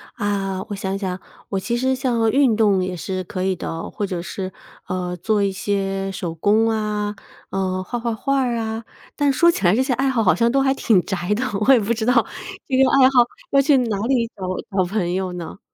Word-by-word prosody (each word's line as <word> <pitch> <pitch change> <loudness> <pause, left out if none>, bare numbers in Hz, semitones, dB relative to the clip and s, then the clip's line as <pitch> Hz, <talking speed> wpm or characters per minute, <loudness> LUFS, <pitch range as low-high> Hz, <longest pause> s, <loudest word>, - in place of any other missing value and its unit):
啊， 195 -2 -2
我 205 - -3
想 195 0 -3
想， 190 -2 -3 0.3
我 195 - -1
其 235 +5 -2
实 260 +2 +1
像 235 -3 +1
运 265 -4 +4
动 205 -4 +3
也 185 0 -3
是 185 +2 -4
可 185 +1 -4
以 190 0 +1
的， 165 -1 -5
或 205 - -3
者 180 -3 -4
是， 185 +1 -5 0.4
呃， 180 -1 -3
做 210 +4 0
一 200 - +1
些 195 0 -2
手 175 -3 -4
工 215 +6 +3
啊， 210 -1 -1 0.3
呃， 185 -1 -1
画 240 +6 -4
画 235 0 -2
画 275 +5 0
儿 245 -2 0
啊， 225 0 -3 0.3
但 290 -1 +2
说 305 +6 +4
起 195 - -3
来 175 +3 +5
这 255 - +2
些 260 -1 0
爱 265 +3 +1
好 245 -4 +1
好 185 - +5
像 235 0 +2
都 275 +2 +3
还 270 0 +3
挺 220 -8 +3
宅 185 0 -1
的， 235 - -1 0.2
我 - - +8
也 250 - +5
不 220 +2 0
知 220 -1 -3
道 250 - +3 0.5
这 260 - +1
个 265 - +6
爱 260 -1 +6
好 265 -2 +4 0.3
要 275 - +5
去 280 0 +4
哪 230 -5 0
里 245 -3 +2
找 195 - -9 0.3
找 185 - +3
朋 180 -2 -1
友 185 -1 -2
呢？ 175 +2 -7
210 Hz, 245 characters per minute, -21 LUFS, 190-240 Hz, 0.5 s, 我